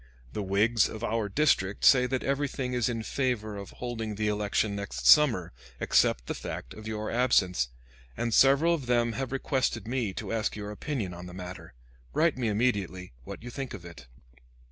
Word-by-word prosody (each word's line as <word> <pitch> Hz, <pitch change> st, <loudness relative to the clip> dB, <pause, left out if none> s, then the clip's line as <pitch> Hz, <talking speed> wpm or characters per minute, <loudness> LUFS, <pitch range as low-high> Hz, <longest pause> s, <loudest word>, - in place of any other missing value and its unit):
The -, -, -2 dB
Whigs 105 Hz, +3 st, +2 dB
of 110 Hz, +1 st, -7 dB
our 110 Hz, -2 st, -1 dB
district 105 Hz, -6 st, +1 dB
say 125 Hz, -2 st, +7 dB
that 130 Hz, 0 st, -2 dB
everything 135 Hz, -2 st, -1 dB
is 125 Hz, -1 st, +1 dB
in 115 Hz, -2 st, -3 dB
favor 115 Hz, -5 st, -1 dB
of 100 Hz, -1 st, -7 dB
holding 115 Hz, -3 st, -5 dB
the 105 Hz, +1 st, 0 dB
election 105 Hz, 0 st, 0 dB
next 80 Hz, -12 st, -5 dB
summer, 115 Hz, -, +6 dB, 0.3 s
except -, -, +2 dB
the -, -, -3 dB
fact 60 Hz, -, -6 dB
of 110 Hz, 0 st, -10 dB
your 110 Hz, 0 st, -3 dB
absence; 95 Hz, -, +2 dB, 0.5 s
and 115 Hz, -1 st, -1 dB
several 140 Hz, +7 st, +5 dB
of 145 Hz, -7 st, -3 dB
them 120 Hz, -1 st, +2 dB
have 130 Hz, +2 st, -4 dB
requested 130 Hz, -4 st, -1 dB
me 120 Hz, -4 st, -1 dB
to -, -, -5 dB
ask 115 Hz, 0 st, -1 dB
your 105 Hz, 0 st, -6 dB
opinion 105 Hz, -4 st, -4 dB
on 90 Hz, +1 st, -8 dB
the 90 Hz, -, -10 dB
matter. 90 Hz, -7 st, -9 dB, 0.4 s
Write 165 Hz, -1 st, +3 dB
me 125 Hz, -3 st, -1 dB
immediately 100 Hz, -, -1 dB
what -, -, -8 dB
you 125 Hz, -, -7 dB
think 135 Hz, -3 st, -5 dB
of 90 Hz, -4 st, -11 dB
it. 85 Hz, -7 st, -11 dB
110 Hz, 185 wpm, -28 LUFS, 100-125 Hz, 0.5 s, say